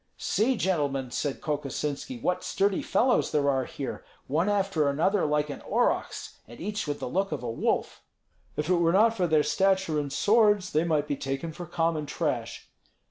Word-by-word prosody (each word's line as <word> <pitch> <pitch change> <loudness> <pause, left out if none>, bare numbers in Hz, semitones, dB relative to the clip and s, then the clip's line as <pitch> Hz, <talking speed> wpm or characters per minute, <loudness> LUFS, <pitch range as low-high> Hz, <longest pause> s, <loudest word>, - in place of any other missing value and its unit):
"See, 245 +3 +1
gentlemen," 140 - 0
said 140 +2 -2
Kokosinski, 150 - -3
"what 180 0 0
sturdy 195 -1 +1
fellows 250 +1 +2
there 145 -1 +1
are 130 -2 0
here; 135 +1 -6 0.2
one 165 +8 +1
after 195 -7 +1
another 165 +5 +1
like 150 0 0
an - - -7
aurochs, - - -1
and 120 +2 -12
each 205 -1 -3
with 145 -1 -2
the - - -4
look 195 +8 -1
of 145 -5 -4
a 120 - -2
wolf." 115 - -1 0.6
"If 150 - -1
it 180 - +3
were 170 0 +3
not 225 +4 +4
for 180 -4 +1
their 155 -2 +3
stature 190 0 +1
and 145 -1 -3
swords, 205 +4 +3
they 155 +2 +2
might 150 -3 +1
be 145 - -1
taken 135 +4 -4
for 175 +2 -8
common 165 -3 -1
trash." - - -3
160 Hz, 185 wpm, -27 LUFS, 145-195 Hz, 0.6 s, not